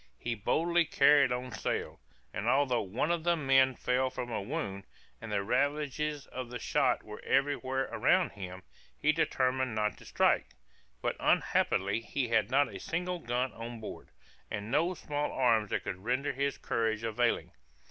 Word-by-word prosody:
He 120 - -3
boldly 170 +10 +2
carried 145 -3 +5
on 125 +1 -3
sail, - - -3 0.3
and 100 +5 -3
although 130 -1 +3
one 115 - -1
of 170 -2 0
the 175 0 +3
men 135 -3 +4
fell 125 +2 +1
from 125 -1 -5
a 110 - -1
wound, 100 0 -4 0.4
and - - -7
the 100 - 0
ravages 145 +4 0
of 130 -2 -6
the 125 - -5
shot - - +1
were 105 0 -9
every 140 +1 +2
where 130 -1 -2
around - - +2
him, 95 -1 -8 0.3
he 155 - +3
determined 130 -5 0
not 105 0 0
to - - -14
strike. - - +1 0.5
But - - -1
unhappily 100 +4 +2
he 125 +1 -2
had 110 -1 +2
not 140 +3 +4
a - - -6
single 180 +1 -2
gun 125 -1 -1
on 115 0 -7
board, 110 - -8 0.4
and 105 +2 -5
no 170 +6 +2
small 150 -2 -3
arms 115 -5 +2
that - - -1
could 95 0 -5
render 130 +5 0
his 140 +1 -1
courage 110 -1 -1
availing. 115 +2 0
130 Hz, 170 wpm, -31 LUFS, 115-145 Hz, 0.5 s, carried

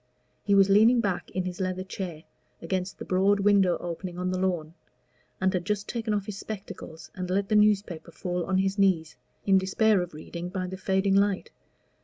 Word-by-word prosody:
He 200 - +3
was 195 -1 +6
leaning 220 +5 +5
back 200 -6 -1
in 185 - -2
his 180 0 -5
leather 185 0 -2
chair, 180 -4 -6 0.4
against 185 +2 -3
the - - -7
broad 195 +2 +2
window 195 -3 +4
opening 175 +1 -6
on 180 0 -1
the 185 - -1
lawn, 175 -4 -1 0.7
and 190 +1 +1
had 180 -2 -1
just 205 +2 -2
taken 225 -2 -3
off 205 -2 0
his 205 -2 -6
spectacles 165 -6 -8
and 180 -1 -5
let 195 +2 0
the 215 - +2
newspaper 205 -5 +2
fall 180 +1 -3
on 190 0 +1
his 195 +1 0
knees, 170 -6 +2 0.3
in 195 -1 +5
despair 195 +1 +2
of 175 -3 -6
reading 170 +3 -6
by 185 0 -3
the 185 +1 -5
fading 190 +1 +1
light. 200 -1 +1
190 Hz, 195 wpm, -27 LUFS, 180-200 Hz, 0.7 s, was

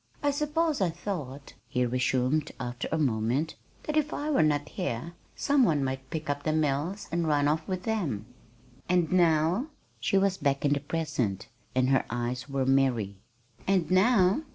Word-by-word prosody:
"I 290 - +3
suppose 300 0 0
I 185 - +3
thought," 155 -6 -6
he 125 0 0
resumed 130 +4 +1
after 120 0 -4
a 160 - +1
moment, 130 +2 0 0.3
"that 305 - -3
if 310 -1 +1
I 300 +1 -2
were 280 - +4
not 145 -1 +2
here 170 - -4 0.2
some 285 -2 +3
one 150 - +2
might 130 0 -3
pick 160 -2 -4
up 145 0 -1
the 155 +1 0
mills 155 +6 -1
and 170 -1 0
run 145 -1 +3
off 155 +1 0
with 185 -1 -3
them." 160 - -1 0.6
"And 175 -3 +2
now?" 175 - +3 0.3
She 195 - +1
was 195 -1 +2
back 140 0 0
in 145 - +4
the 145 - 0
present, 135 - -2 0.3
and 130 0 +3
her 135 - +3
eyes 120 +3 -3
were 135 -1 0
merry. 130 -7 +2 0.5
"And 185 -4 +2
now? 190 +2 +4
155 Hz, 175 wpm, -28 LUFS, 130-185 Hz, 0.6 s, were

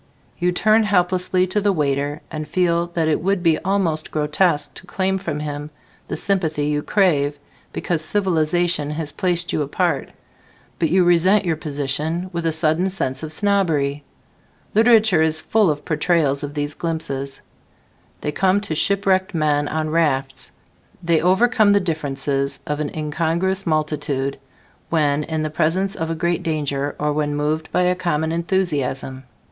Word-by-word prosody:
You 180 0 +2
turn 215 +5 +3
helplessly 185 -2 +1
to 195 +3 -1
the 205 0 +2
waiter 145 -3 -1
and 155 -1 -5
feel 170 +1 +1
that 165 -2 +1
it 155 - +1
would 190 0 0
be 165 -2 +3
almost 175 -5 0
grotesque 155 +1 +1
to 185 - -11
claim 190 +1 0
from 155 -6 -4
him 145 0 -5 0.4
the - - -4
sympathy 160 -7 0
you 150 0 0
crave 150 -7 +1 0.3
because 165 -3 -2
civilization 175 -4 0
has 150 0 -4
placed 175 -1 -1
you - - 0
apart, 145 -1 -1 0.7
but 165 - +1
you 185 +3 +4
resent 180 +4 +4
your 165 -2 +1
position 155 +4 -3
with 170 -1 -2
a - - +2
sudden 160 +3 +2
sense 130 -8 -2
of 155 -1 -5
snobbery. 155 -7 +1 0.7
Literature 220 -5 +5
is 160 0 +2
full 215 +2 +2
of 150 -1 -3
portrayals 155 -3 +1
of 145 +1 -6
these 145 0 -2
glimpses: 140 -5 -3 0.8
they 150 - -2
come 190 +4 +2
to 200 - -4
shipwrecked 190 +2 +1
men 145 -2 +1
on 155 0 -2
rafts; 150 -5 0 0.5
they 165 -2 +2
overcome 205 +4 +4
the 200 - +4
differences 140 -5 -2
of 150 0 -3
an 150 -1 -2
incongruous 170 +5 -1
multitude 150 -3 -1 0.5
when 150 -2 +1
in 160 -1 -2
the 155 - -3
presence 180 +5 0
of 165 0 -3
a 165 - -1
great 170 +1 0
danger 145 -3 -2
or 150 0 0
when 145 -1 -1
moved 155 +2 -2
by 180 - +2
a 180 0 +3
common 160 -3 -1
enthusiasm. 145 -7 -2
160 Hz, 155 wpm, -21 LUFS, 150-185 Hz, 0.8 s, Literature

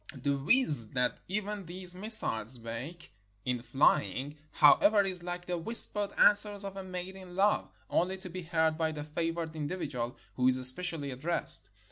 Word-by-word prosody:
The 140 -1 -3
whizz 145 - -1
that 125 -1 -2
even 205 -1 -5
these 180 +1 -6
missiles 180 - +1
make 120 +9 -9 0.3
in 125 -1 -3
flying, 140 +1 -1 0.2
however, 200 +8 +4
is 185 -2 -5
like 175 0 -7
the 180 -1 -4
whispered 210 +1 +4
answers 205 -1 +4
of 195 -1 -8
a 195 - -8
maid 185 0 -8
in 185 -2 -13
love, 200 +2 0 0.2
only 185 +2 -2
to 190 -1 -11
be 185 +1 -7
heard 160 -2 -2
by 160 -1 -2
the 150 -1 -7
favored 165 +1 -5
individual 145 -6 -6 0.2
who 125 0 -1
is 130 0 +4
especially 140 +3 +4
addressed. 160 +7 +5
170 Hz, 160 wpm, -29 LUFS, 140-190 Hz, 0.3 s, addressed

